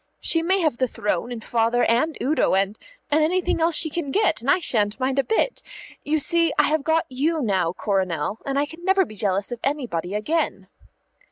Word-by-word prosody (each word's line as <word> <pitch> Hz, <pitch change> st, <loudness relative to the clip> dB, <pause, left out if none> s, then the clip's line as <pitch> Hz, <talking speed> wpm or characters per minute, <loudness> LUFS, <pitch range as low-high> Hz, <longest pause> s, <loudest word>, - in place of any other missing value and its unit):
"She 330 Hz, -, +3 dB
may 380 Hz, +3 st, +1 dB
have 305 Hz, -8 st, 0 dB
the 255 Hz, -, +2 dB
throne 210 Hz, 0 st, -2 dB
and 230 Hz, -2 st, -6 dB
Father 235 Hz, +1 st, +1 dB
and 255 Hz, +8 st, +1 dB
Udo, 290 Hz, -7 st, +1 dB
and 195 Hz, +2 st, +1 dB, 0.4 s
and 305 Hz, +1 st, +3 dB
anything 350 Hz, +1 st, 0 dB
else 330 Hz, 0 st, +2 dB
she 315 Hz, -1 st, +3 dB
can 320 Hz, -3 st, -3 dB
get, 380 Hz, -, +1 dB
and 250 Hz, -, -3 dB
I 370 Hz, -, +5 dB
shan't 215 Hz, -, -1 dB
mind 265 Hz, +1 st, 0 dB
a -, -, +3 dB
bit. 445 Hz, -, 0 dB, 0.4 s
You 310 Hz, +2 st, 0 dB
see, 335 Hz, +1 st, +2 dB
I -, -, +5 dB
have 310 Hz, -1 st, +1 dB
got 320 Hz, +2 st, +1 dB
you 300 Hz, +6 st, -1 dB
now, 190 Hz, -, 0 dB
Coronel, 190 Hz, -2 st, -2 dB
and 275 Hz, 0 st, -2 dB
I 285 Hz, -, +2 dB
can 325 Hz, +3 st, -13 dB
never 385 Hz, 0 st, +3 dB
be 215 Hz, -, -12 dB
jealous 200 Hz, 0 st, -1 dB
of 240 Hz, -, -5 dB
anybody 235 Hz, -, -2 dB
again." 315 Hz, +11 st, -2 dB
275 Hz, 205 wpm, -23 LUFS, 215-325 Hz, 0.4 s, I